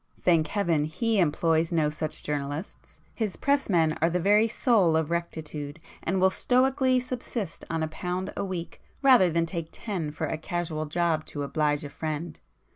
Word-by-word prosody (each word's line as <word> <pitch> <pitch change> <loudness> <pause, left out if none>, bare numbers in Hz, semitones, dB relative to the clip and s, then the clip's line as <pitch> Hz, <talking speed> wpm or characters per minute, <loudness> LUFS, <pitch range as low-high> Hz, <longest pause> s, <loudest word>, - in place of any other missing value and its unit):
Thank 165 -3 +3
Heaven, 170 -6 +1
he 220 +7 0
employs 165 0 +2
no 155 -3 +2
such 155 0 -4
journalists; 145 +4 -5
his 215 -5 -2
pressmen 185 - +2
are 165 - +4
the 180 +1 0
very 205 +5 +4
soul 210 -8 +3
of 160 0 -1
rectitude, 155 -3 -4 0.2
and 190 +3 0
will 190 +1 +4
stoically 255 +3 +2
subsist 245 -7 -5
on 165 -1 -1
a - - 0
pound 180 +4 -4
a - - -2
week 185 -3 -5 0.2
rather 250 -9 +7
than 165 0 +1
take 165 -1 -4
ten 185 -9 -4
for 150 - -3
a 160 - -3
casual 160 -2 -3
job 165 -1 0
'to 145 - -4
oblige 150 0 0
a 145 - -6
friend. 155 +2 -4
170 Hz, 170 wpm, -27 LUFS, 155-195 Hz, 0.2 s, rather